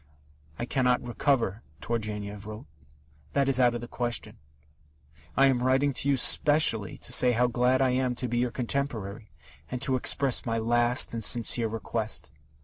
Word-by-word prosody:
"I 120 - -4
cannot 125 -1 0
recover," 120 -4 -1 0.2
Turgenev 105 -3 -5
wrote: 110 +4 -9 0.7
That 140 -1 +1
is 135 -2 +2
out 120 -1 +3
of 120 - -5
the 120 - -8
question. 120 - -5 1.0
I 135 - +5
am 130 -3 +2
writing 135 +2 +1
to 140 - -1
you 140 - +2
specially 140 -6 +3
to - - -1
say 125 -1 +5
how 120 +2 +2
glad 125 +2 +1
I 130 - +2
am 125 -1 -1
to 125 +1 -3
be 120 0 -2
your 125 0 0
contemporary, 115 -5 -4 0.4
and 125 - -4
to 135 -2 0
express 130 +1 +1
my 115 -1 -2
last 120 +2 +1
and 115 -1 -4
sincere 115 +1 +2
request. 110 - -3
120 Hz, 165 wpm, -27 LUFS, 115-130 Hz, 1.0 s, I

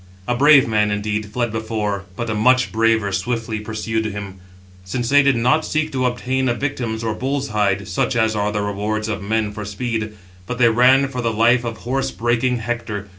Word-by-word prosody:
A 125 - +1
brave 140 +1 +6
man, 105 -2 +2
indeed, 105 +1 -2
fled 120 +2 -2
before, 110 -3 -3
but 120 +3 -4
a 110 - -1
much 125 +4 +3
braver 110 -2 +2
swiftly 110 +3 -2
pursued 110 +1 -3
him; 100 -3 -6 0.4
since 120 +6 -3
they 145 0 +6
did 140 -2 +3
not 125 +7 +2
seek 155 0 -1
to 130 -1 0
obtain 130 +1 -1
a 120 - 0
victim 125 -4 -3
or 115 - -1
a - - -4
bull's 135 +3 -2
hide, 100 -2 0
such 95 - -1
as 110 -1 +2
are 105 0 0
the 105 0 -2
rewards 105 +1 -2
of 105 -2 -3
men 105 +1 -1
for 105 +1 -6
speed, 110 +1 -3 0.3
but 125 - -4
they 120 -2 +5
ran 130 +4 +4
for 125 -2 -4
the 115 -1 0
life 120 +3 +3
of 115 -2 -4
horse 130 +4 -2
breaking 120 +2 0
Hector. 110 -3 -4
115 Hz, 205 wpm, -20 LUFS, 105-125 Hz, 0.4 s, brave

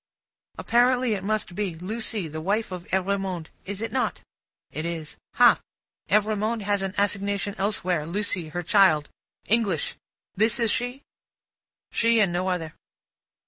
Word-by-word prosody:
"Apparently 245 0 +3
it 195 -2 -3
must 215 -2 -1
be. 190 -3 -2
Lucie, 210 +2 -2
the 155 +1 -6
wife 205 +5 0
of 180 -1 -6
Evrémonde; 190 -3 -1 0.2
is 200 +1 -5
it 225 -1 -3
not?" 255 +1 -1 0.5
It 155 - -4
is. 165 -2 -5 0.2
"Hah! - - +6 0.5
Evrémonde 215 +2 +1
has 205 0 +1
an 195 0 -3
assignation 200 0 0
elsewhere. 185 -6 0
Lucie, 185 -2 -2
her 175 +3 -4
child. 175 -5 +4 0.4
English. 205 -8 +1 0.4
This 220 +4 +3
is 230 -2 +2
she?" 245 +3 -2 0.9
She 230 0 +3
and 195 -5 +3
no 180 +2 0
other. 165 -4 -2
200 Hz, 140 wpm, -25 LUFS, 175-215 Hz, 0.9 s, Hah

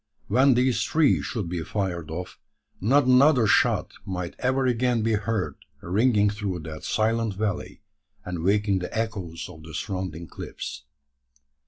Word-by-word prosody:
When 130 +4 +5
these 125 0 +2
three 155 -3 +3
should 110 -8 -3
be 85 -1 -3
fired 90 -4 -3
off, 90 +3 -6 0.4
not 130 +7 +3
another 130 0 +5
shot 105 - +3
might 90 -3 -4
ever 130 +1 +1
again 120 -2 +1
be 115 0 +2
heard 105 -1 -1 0.2
ringing 105 +3 +2
through 100 -4 -3
that 80 0 -8
silent 110 -1 0
valley, 105 -2 -3 0.4
and 90 -1 -4
waking 100 0 +2
the 90 - -5
echoes 100 -8 -3
of 80 - -12
the 80 0 -10
surrounding 90 -4 -4
cliffs. - - -7
105 Hz, 145 wpm, -25 LUFS, 90-120 Hz, 0.4 s, When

